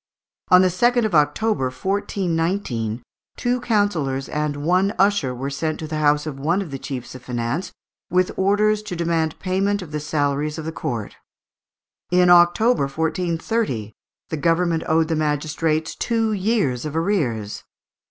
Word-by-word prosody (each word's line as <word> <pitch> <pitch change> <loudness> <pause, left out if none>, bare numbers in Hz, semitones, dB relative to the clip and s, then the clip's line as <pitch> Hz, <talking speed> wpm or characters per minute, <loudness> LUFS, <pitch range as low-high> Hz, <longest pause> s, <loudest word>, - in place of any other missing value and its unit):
On 180 0 +7
the 185 - +4
2nd 240 +6 +2
of 215 - -2
October, 150 +3 +2
1419, 165 - -2 0.3
two 245 0 0
councillors 175 - 0
and 150 -1 -2
one 185 +4 +2
usher 195 -10 +2
were 135 +3 -4
sent 155 +3 -2
to 160 - -6
the 155 0 -3
house 150 0 +3
of 145 -3 -5
one 165 +7 +1
of 165 - -10
the 135 - -5
chiefs 130 -3 -6
of 130 - -10
finance, 120 +7 -3 0.4
with 180 +1 +2
orders 210 +2 +2
to 210 -4 -6
demand 165 -2 0
payment 195 +1 0
of 160 - -11
the 150 - -2
salaries 150 0 -1
of 160 - -6
the 160 - -3
court. 120 -10 -4 0.9
In 180 0 +4
October, 175 - +5
1430, 160 - -2 0.4
the 160 - -3
government 165 +1 +1
owed 160 0 +3
the 165 - 0
magistrates 155 +1 -1
two 225 -2 0
years 190 - 0
of 150 0 -5
arrears. 140 - -1
160 Hz, 150 wpm, -22 LUFS, 145-195 Hz, 0.9 s, On